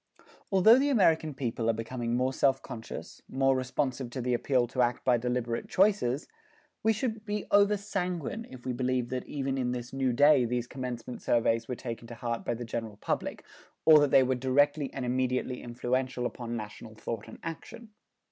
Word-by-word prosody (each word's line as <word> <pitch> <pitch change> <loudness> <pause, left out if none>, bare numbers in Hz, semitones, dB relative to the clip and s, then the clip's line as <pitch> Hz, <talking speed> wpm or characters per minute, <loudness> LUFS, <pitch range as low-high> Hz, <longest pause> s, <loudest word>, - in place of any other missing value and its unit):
Although 220 +6 +7
the 285 +2 +2
American 160 - +3
people 115 -3 -1
are - - +4
becoming 115 +1 -3
more 130 +2 +1
self 135 0 +2
conscious, 115 -1 -8
more 135 0 +2
responsive 130 0 -2
to 125 - -6
the 125 0 0
appeal 125 0 +2
to 125 +2 -1
act 120 0 0
by 125 -2 +4
deliberate 120 -1 -2
choices, 185 - +2 0.5
we 225 - +3
should 220 -1 -2
be 210 -1 -3
over 205 +1 +5
sanguine 195 0 -3
if 130 -1 -12
we 130 - -1
believed 125 0 -1
that 130 -1 -3
even 135 -2 -2
in 125 -1 0
this 120 0 -6
new 135 -1 +1
day 145 +1 +5
these 120 0 -1
commencement 125 -2 -6
surveys 115 -1 +1
were 125 - -3
taken 115 -1 -6
to 120 - -8
heart 115 0 -3
by 120 - -1
the 120 +1 -6
general 115 -2 -5
public, - - -3 0.4
or 155 -1 +9
that 145 -1 +3
they 135 - +6
were 130 +1 +1
directly 140 +3 +2
and 130 - -4
immediately 125 0 -1
influential 125 +1 -2
upon 120 -1 -4
national 110 +1 -8
thought 110 0 -5
and - - -10
action. 165 +8 -7
130 Hz, 185 wpm, -29 LUFS, 120-145 Hz, 0.5 s, or